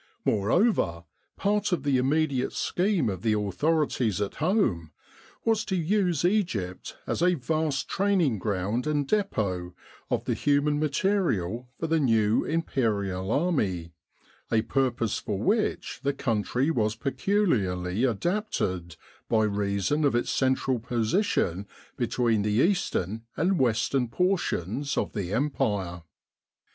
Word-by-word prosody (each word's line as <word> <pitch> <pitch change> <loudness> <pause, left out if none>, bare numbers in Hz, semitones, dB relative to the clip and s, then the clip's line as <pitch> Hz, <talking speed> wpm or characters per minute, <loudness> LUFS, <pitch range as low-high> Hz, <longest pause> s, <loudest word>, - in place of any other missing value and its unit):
Moreover, 100 - +2 0.3
part 205 0 +1
of 170 -7 0
the 140 -3 +2
immediate 135 -1 +1
scheme 180 - 0
of 95 -4 -3
the 110 -1 +2
authorities 125 - 0
at 100 -1 -3
home 150 - +1 0.6
was 225 -1 +2
to 190 - -1
use 175 -2 +1
Egypt 170 - -1
as - - -2
a 180 0 +4
vast 155 0 -1
training 185 - +1
ground 105 +6 -1
and 145 -2 0
depot 95 - -1 0.3
of - - -1
the - - 0
human 145 +1 +1
material 140 - 0
for - - -2
the 165 0 +2
new 115 -5 +3
Imperial 105 - -1
Army, 100 - 0 0.6
a 110 -1 +3
pur 130 +3 +1
pose 120 -3 -2
for 105 - -3
which 210 - 0
the 140 0 0
country 125 +3 0
was 110 -6 0
peculiarly 120 - 0
adapted, 110 - -1 0.3
by 110 -2 +3
reason 100 +7 0
of 140 -4 +2
its 120 - 0
central 130 -1 +1
position 110 - 0 0.3
between 120 -3 +1
the 105 - 0
eastern 115 - +1 0.2
and 180 +3 +2
western 125 +1 +1
portions 145 - -1
of - - -1
the 95 -3 -3
Empire. 105 - -1
130 Hz, 125 wpm, -27 LUFS, 105-165 Hz, 0.6 s, a